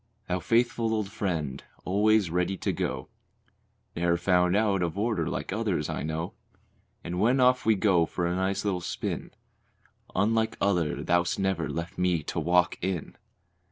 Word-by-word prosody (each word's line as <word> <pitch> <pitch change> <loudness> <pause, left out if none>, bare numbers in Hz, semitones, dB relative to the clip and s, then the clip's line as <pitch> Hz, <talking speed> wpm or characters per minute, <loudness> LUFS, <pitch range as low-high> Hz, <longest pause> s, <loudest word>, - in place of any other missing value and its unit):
Thou 90 0 0
faithful 115 +2 +1
old 105 -2 -2
friend, 80 -11 -3 0.2
always 105 -1 +3
ready 90 +2 0
to - - -1
go; 65 - -3 0.9
Ne'er 85 0 +2
found 90 +1 +3
out 100 -3 +2
of 85 +1 -2
order 105 -7 0
like - - -4
others - - -1
I - - -3
know; 80 +2 -3 0.7
And 90 +1 -4
when 120 +6 +3
off 125 -1 +3
we 110 - +5
go 95 -5 +3
for 90 - -2
a 85 +1 0
nice 95 +2 -1
little 95 -3 0
spin, - - -4 0.9
Unlike 110 +2 +1
others, 90 -6 0
thou'st 85 0 +2
never 95 -1 0
left 85 +2 -5
me 90 -3 +1
to - - -3
"walk 90 0 +2
in." 90 -3 -3
90 Hz, 160 wpm, -28 LUFS, 85-105 Hz, 0.9 s, we